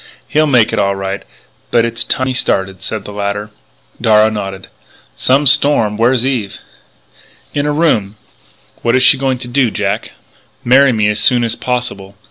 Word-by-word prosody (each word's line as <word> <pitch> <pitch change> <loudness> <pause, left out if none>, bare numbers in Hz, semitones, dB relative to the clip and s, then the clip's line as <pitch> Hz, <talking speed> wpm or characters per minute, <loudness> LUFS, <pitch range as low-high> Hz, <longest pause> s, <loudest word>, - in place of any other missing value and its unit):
"He'll 155 +1 +1
make 125 -6 +3
it - - 0
all 100 0 +1
right, 95 +1 -4 0.5
but 115 -1 +2
it's 115 0 -3
time 130 +3 -1
he 130 - -2
started," 95 -6 -1
said 105 0 -5
the 105 - -9
latter. 100 +1 -4 0.5
Darragh 110 0 +3
nodded: 95 -2 -6 0.5
"Some 135 +3 +1
storm. 140 -6 +3
Where 115 +3 +2
is 130 -2 0
Eve?" 120 -7 -2 1.0
"In 145 0 -1
her 150 - 0
room." 145 -11 0 0.7
"What 120 +1 +1
is 130 - +3
she 130 - +5
going 135 -1 -1
to 125 0 -6
do, 125 0 +1
Jack?" - - -3 0.5
"Marry 135 +2 +5
me 110 -3 +1
as 105 0 0
soon 120 +3 +3
as 115 -1 -1
possible. 120 -7 -4
115 Hz, 175 wpm, -14 LUFS, 105-130 Hz, 1.0 s, she